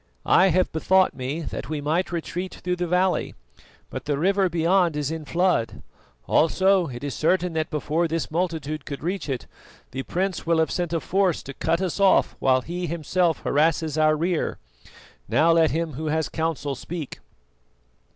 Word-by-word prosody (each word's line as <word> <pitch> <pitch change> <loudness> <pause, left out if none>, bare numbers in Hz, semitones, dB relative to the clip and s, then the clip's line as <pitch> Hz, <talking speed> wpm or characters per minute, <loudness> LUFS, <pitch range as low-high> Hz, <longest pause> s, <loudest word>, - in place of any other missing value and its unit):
I 190 - +5
have 185 0 +2
bethought 185 +4 +3
me 135 +5 -4
that 145 - -6
we 155 -1 -2
might 160 +6 -1
retreat 175 +2 -4
through 180 0 -3
the 175 0 -2
valley, 180 +2 +1 0.6
but - - -6
the 145 -2 0
river 190 +4 +2
beyond 170 0 +2
is 150 0 -1
in 160 -1 -5
flood; 175 -7 0 0.4
also 190 +2 +3
it 120 -1 -8
is 145 -2 -3
certain 180 +2 +1
that 160 -1 -1
before 155 +3 0
this 165 -1 -3
multitude 160 -3 -2
could 140 0 -6
reach 180 -1 -3
it, 130 -2 -3 0.5
the 135 - -3
prince 185 +5 -2
will 165 0 +2
have 160 0 +1
sent 175 -2 -2
a 165 - 0
force 190 0 0
to 140 - -8
cut 165 +5 0
us 185 0 -2
off 195 -1 +4
while 130 -1 +3
he 175 +4 -4
himself 170 +1 0
harasses 155 +1 +1
our 155 0 +4
rear. 170 +1 -1 0.7
Now 165 +2 +4
let 165 -1 +4
him 160 0 -2
who 155 +4 -4
has 160 +1 0
counsel 160 -3 -2
speak." 140 +4 -6
165 Hz, 175 wpm, -24 LUFS, 150-180 Hz, 0.7 s, I